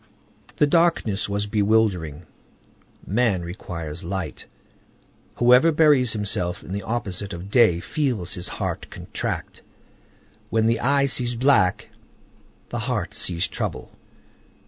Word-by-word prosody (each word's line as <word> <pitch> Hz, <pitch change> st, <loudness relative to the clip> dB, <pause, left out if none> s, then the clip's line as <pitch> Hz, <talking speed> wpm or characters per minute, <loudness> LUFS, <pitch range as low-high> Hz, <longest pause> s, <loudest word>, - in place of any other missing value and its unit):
The -, -, +4 dB
darkness 145 Hz, -, +2 dB
was 100 Hz, +1 st, -1 dB
bewildering. 100 Hz, -7 st, +1 dB, 0.8 s
Man 105 Hz, -4 st, +1 dB
requires 85 Hz, -3 st, -6 dB
light. 90 Hz, -2 st, -5 dB, 0.9 s
Whoever 125 Hz, +7 st, +5 dB
buries 145 Hz, -6 st, +4 dB
himself 95 Hz, -4 st, -2 dB
in 95 Hz, -, -7 dB
the 100 Hz, -, -2 dB
opposite 100 Hz, -2 st, -4 dB
of 90 Hz, +3 st, -8 dB
day 110 Hz, -9 st, +5 dB
feels 120 Hz, -, -1 dB
his 90 Hz, -, -4 dB
heart -, -, -4 dB
contract. -, -, -5 dB, 0.9 s
When 110 Hz, -1 st, +2 dB
the 115 Hz, 0 st, +2 dB
eye 140 Hz, +3 st, +2 dB
sees 125 Hz, -3 st, 0 dB
black, 120 Hz, -7 st, +2 dB, 0.8 s
the -, -, -3 dB
heart -, -, -2 dB
sees 85 Hz, +3 st, 0 dB
trouble. 90 Hz, -, -5 dB
105 Hz, 115 wpm, -23 LUFS, 90-125 Hz, 0.9 s, Whoever